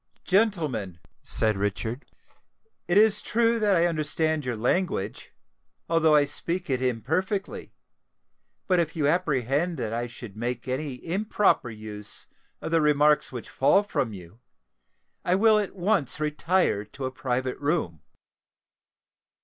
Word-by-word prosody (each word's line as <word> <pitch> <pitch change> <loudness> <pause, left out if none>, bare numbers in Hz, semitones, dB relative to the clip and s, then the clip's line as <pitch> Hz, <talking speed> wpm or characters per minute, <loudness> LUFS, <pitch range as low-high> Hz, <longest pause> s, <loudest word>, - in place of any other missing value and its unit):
"Gentlemen," 160 - 0 0.2
said 110 -2 +2
Richard, 110 +6 -3 0.8
"it 175 - +2
is 210 0 +5
true 230 0 +1
that 205 -3 +3
I 170 0 +3
understand 155 -1 0
your 125 -2 -3
language, 115 - -1 0.6
although 160 -2 +3
I 145 -1 +5
speak 170 +3 -1
it 130 -1 0
imperfectly; 160 - -2 0.9
but 180 -2 +2
if 165 -1 -1
you 155 -3 0
apprehend 150 0 0
that 115 -3 -3
I 120 +1 -2
should 120 -3 -10
make 120 +2 -4
any 130 0 -4
improper 200 - +1
use 105 -1 -4 0.4
of 160 - -4
the 165 -1 +3
remarks 150 0 +3
which 125 -3 -7
fall 195 +9 +3
from 135 - -2
you, 95 +2 -12 0.8
I 180 - +2
will 215 +2 +4
at 205 -1 -4
once 185 - +1
retire 155 - +1
to 130 +6 -7
a 130 - -3
private 130 -1 -3
room." 145 - -1
150 Hz, 135 wpm, -26 LUFS, 120-180 Hz, 0.9 s, is